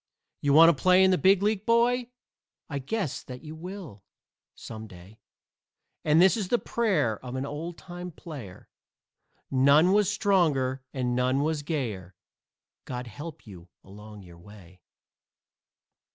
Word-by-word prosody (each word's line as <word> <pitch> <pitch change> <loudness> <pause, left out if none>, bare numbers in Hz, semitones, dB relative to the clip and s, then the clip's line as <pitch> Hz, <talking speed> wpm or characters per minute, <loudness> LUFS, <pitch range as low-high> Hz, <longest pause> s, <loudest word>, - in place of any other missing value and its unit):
You 140 -1 +2
want 165 +2 +7
to - - -14
play 185 +1 +5
in 190 - +5
the 185 - +3
Big 195 +1 +4
League, 210 -1 0
boy? 240 +2 +2 0.6
I 145 -3 -4
guess 155 - -3
that 125 -1 -10
you 155 0 -8
will, 165 - -9 0.5
some 110 -1 -9
day, 95 +3 -15 0.8
And 155 +1 +3
this 190 +4 +6
is 210 -5 -3
the 240 - +2
prayer 175 - -1
of 125 0 -6
an 130 +1 -3
old 160 +4 -6
time 175 0 -8
player 145 - -10 0.8
None 140 +7 +5
was 205 0 +3
stronger 155 -11 +1
and 125 -2 -2
none 130 +3 +1
was 155 -1 -1
gayer 115 - -4 0.7
God 125 -1 -5
help 150 +7 -9
you 90 -5 -13
along 105 +1 -12
your 85 -2 -15
way. 95 -2 -16
145 Hz, 145 wpm, -27 LUFS, 115-185 Hz, 0.8 s, want